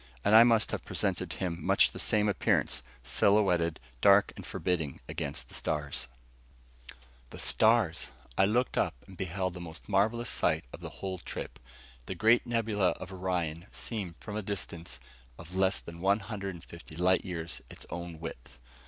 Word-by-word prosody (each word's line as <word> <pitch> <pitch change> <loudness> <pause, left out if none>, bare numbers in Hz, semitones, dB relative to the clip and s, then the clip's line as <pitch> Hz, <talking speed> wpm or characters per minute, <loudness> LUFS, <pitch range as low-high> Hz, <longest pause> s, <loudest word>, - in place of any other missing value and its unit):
And 105 - +4
I 110 +1 +11
must 115 -2 +3
have - - -3
presented - - 0
to - - -4
him 85 -3 -3
much - - +4
the - - -8
same 105 -1 +2
appearance, 100 -10 +1 0.2
silhouetted 90 - +3 0.2
dark 100 +1 +6
and - - -8
forbidding 80 -6 -2
against 65 -3 -4
the - - -15
stars. 75 -3 -2 1.2
The - - -10
stars! 110 -7 +3 0.3
I 95 - +5
looked 120 +5 +1
up, - - +1
and 95 - -13
beheld 95 +1 -2
the 90 - -7
most 85 -1 -9
marvelous 110 +4 +2
sight 80 -3 +1
of - - -7
the - - -6 0.2
whole 95 -1 -3
trip - - -6 0.5
the 95 - -3
Great 115 +7 +4
Nebula 110 -5 +2
of 95 - -9
Orion 90 -2 -2
seen 100 -8 -4
from 105 - -7
a 110 - -1
distance 85 -8 -3 0.4
of 85 +2 -9
less 95 +1 +3
than 85 0 -10
one 100 +3 +3
hundred 100 -2 -5
and 85 - -12
fifty 85 -2 -10
light 90 +2 +3
years 85 -2 -4
its - - -9
own 85 -1 -5
width. 70 -5 -8
95 Hz, 170 wpm, -30 LUFS, 85-105 Hz, 1.2 s, I